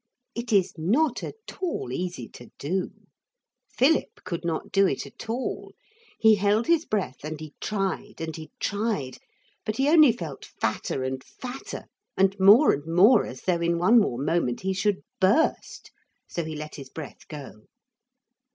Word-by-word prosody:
It 235 0 -5
is 195 -3 +3
not 245 - +2
at - - -5 0.3
all 335 - -2
easy 175 -4 -4
to 120 - -13
do. 180 +6 -1 0.9
Philip 295 +5 +2
could 170 - -4
not 165 -2 -3
do 195 0 +4
it - - -2
at - - -11
all. 245 +3 -3 0.4
He 220 -1 +6
held 205 +3 +2
his 330 -1 +3
breath 185 -13 -2
and 155 0 -5
he 155 -2 -9
tried 205 0 -2
and 160 -1 -4
he 155 -1 -9
tried, 200 - -2 0.4
but 215 0 -3
he 270 +1 +2
only 310 -5 +7
felt 165 - -7
fatter 130 - -2
and 130 0 -3
fatter 255 - -8 0.3
and 195 0 +3
more 205 +10 +8
and 145 +3 -5
more 195 +9 +6
as 130 - -9
though 175 -2 +1
in 170 0 +1
one 220 +8 +6
more 160 - 0
moment 135 -3 0
he 190 0 0
should 200 +1 0 0.2
burst. 200 +12 +1 0.4
So 170 - -3
he 155 0 -5
let 150 0 -7
his 135 -2 -9
breath 155 +1 -9
go. 135 -8 -10
185 Hz, 165 wpm, -26 LUFS, 155-220 Hz, 0.9 s, more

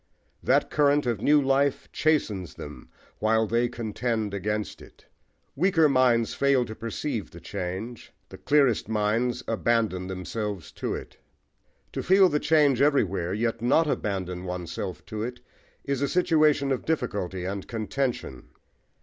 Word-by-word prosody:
That - - +2
current 145 -1 +3
of 115 -4 -1
new 150 +4 +5
life 140 0 +1
chastens 110 - 0
them 75 0 -10 0.3
while 110 +1 +2
they 115 +3 +1
contend 115 -2 -2
against 105 +1 -3
it. - - -17 0.5
Weaker 165 0 +4
minds 125 -4 +3
fail 140 -3 +2
to 110 - -7
perceive 115 +1 -4
the 85 - -12
change: 95 +7 -6 0.2
the - - -11
clearest 140 -7 +2
minds 110 +3 0
abandon 110 -5 0
themselves 95 0 -5
to - - -3
it. - - -9 0.8
To - - -2
feel 190 0 +5
the 150 -2 +1
change 145 -5 +3
everywhere, 100 - +2
yet 115 +1 -1
not 135 +7 +3
abandon 95 - -2
oneself 90 0 -5
to 110 -1 -5
it, 125 +2 -4 0.4
is 140 -1 -2
a 140 - +2
situation 155 -4 +3
of 130 - -1
difficulty 100 - -2
and 95 +1 -4
contention. 115 - -3
115 Hz, 140 wpm, -26 LUFS, 100-140 Hz, 0.8 s, new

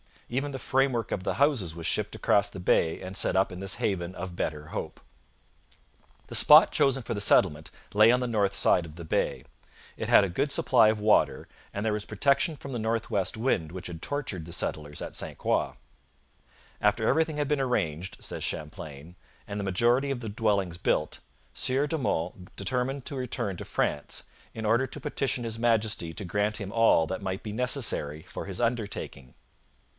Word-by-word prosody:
Even 135 +4 -2
the 135 - -4
framework 130 -3 0
of 95 - -2
the - - -1
houses 130 - +1
was 85 -1 -7
shipped - - -1
across 100 0 +2
the 100 - -9
bay 80 -2 +2
and 95 +1 -7
set - - +1
up 95 +1 +2
in 90 - -7
this 95 0 -1
haven 90 -3 -2
of 90 0 -6
better 75 -3 -3
hope. - - -6 1.3
The - - -6
spot - - +8
chosen 135 -3 +2
for 115 - -3
the 105 - -3
settlement 80 -6 +3 0.2
lay 105 +2 +7
on 125 +1 +2
the 125 - -1
north 100 -4 +1
side 90 - +3
of 80 -1 -11
the 85 - -8
bay. 80 - -1 0.5
It - - -4
had - - +6
a 100 - -1
good 140 +11 -1
supply 125 -5 +4
of 110 0 +1
water, 105 0 +2 0.3
and 100 +2 -3
there 110 - +2
was 105 0 -2
protection 140 - +1
from 140 -1 -9
the 120 - -3
north 110 +1 -2
west 95 -2 0
wind 90 -9 0
which 95 0 -6
had 85 -2 -8
tortured 125 - -4
the 85 - -9
settlers 75 -3 -3
at - - -6
St - - -3
Croix. - - 0 1.1
'After 105 +2 +2
everything 160 +1 +2
had 145 -1 -1
been 150 -2 +1
arranged,' 90 - -2
says - - -5
Champlain, 80 0 -6 0.3
'and 105 0 -4
the 100 - -3
majority 120 +9 +2
of 130 -3 -3
the 110 - -5
dwellings 100 -5 0
built, 75 - 0 0.3
Sieur 135 +3 +2
de 160 - -1
Monts 90 - -1 0.2
determined 125 +5 -2
to 140 - -5
return 115 -6 -3
to - - -7
France, 75 - -1 0.3
in 110 - -5
order 120 +5 +2
to - - -7
petition 135 -4 -1
His 115 -1 -4
Majesty 110 -7 +1
to 100 - -4
grant 105 +4 0
him 100 -2 -5
all 115 -8 +4
that 95 +4 -4
might 95 +1 -4
be 105 - -5
necessary 110 - +1
for - - -7
his 95 -2 -6
undertaking.' 105 - -3
105 Hz, 195 wpm, -28 LUFS, 90-125 Hz, 1.3 s, spot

